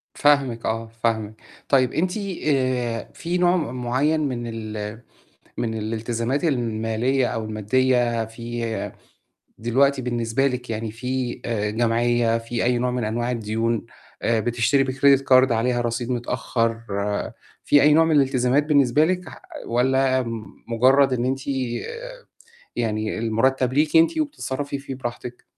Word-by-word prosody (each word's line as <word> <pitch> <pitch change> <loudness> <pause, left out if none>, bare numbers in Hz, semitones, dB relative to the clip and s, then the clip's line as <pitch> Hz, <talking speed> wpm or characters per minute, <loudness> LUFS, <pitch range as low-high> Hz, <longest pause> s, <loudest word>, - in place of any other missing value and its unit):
فاهمِك 135 -6 +2
آه، 115 0 -2
فاهمِك. 110 -2 0 0.4
طيب 130 -2 +3
أنتِ 180 +5 0 0.3
آآ 130 -5 0
في 175 +2 -2
نوع 175 0 +3
م 125 -6 -4
معيّن 140 +6 +1
من 125 -5 -2
ال 110 -1 -6 0.6
من 115 -2 -1
الالتزامات 115 +5 -2
المالية 120 -1 0
أو 115 -1 -3
المادية 120 +2 +1
في 115 0 -5 0.7
دلوقتي 135 +4 +2
بالنسبة 120 +2 0
لِك 125 -2 -4
يعني 110 -1 -3
في 125 +2 -3
آآ 105 -3 -1
جمعية، 115 +1 +2
في 115 +1 -3
أي 125 0 +2
نوع 125 +1 0
من 125 -2 -2
أنواع 120 +3 -1
الديون، 115 0 -1 0.4
بتشتري 120 +4 +2
بcredit 135 +1 +4
card 130 -1 +5
عليها 120 +2 +1
رصيد 120 +1 -2
متأخّر، 115 -1 -1 0.8
في 145 - +5
أي 150 +1 +6
نوع 160 +1 +5
من 160 -1 +2
الالتزامات 135 0 +3
بالنسبة 145 -1 +4
لِك؟ 180 -1 -2
ح - - -13 0.2
والّا 130 +2 +2 0.4
مجرّد 130 +3 +4
إن 120 0 0
أنتِ 135 +1 -1 1.4
يعني 110 -2 -1
المُرتّب 125 +3 +1
ليكِ 150 +3 +2
أنتِ 165 - +4
وبتتصرّفي 145 - -3
فيه 135 -1 -7
براحتِك؟ 120 -1 -7
120 Hz, 130 wpm, -23 LUFS, 115-135 Hz, 1.4 s, أي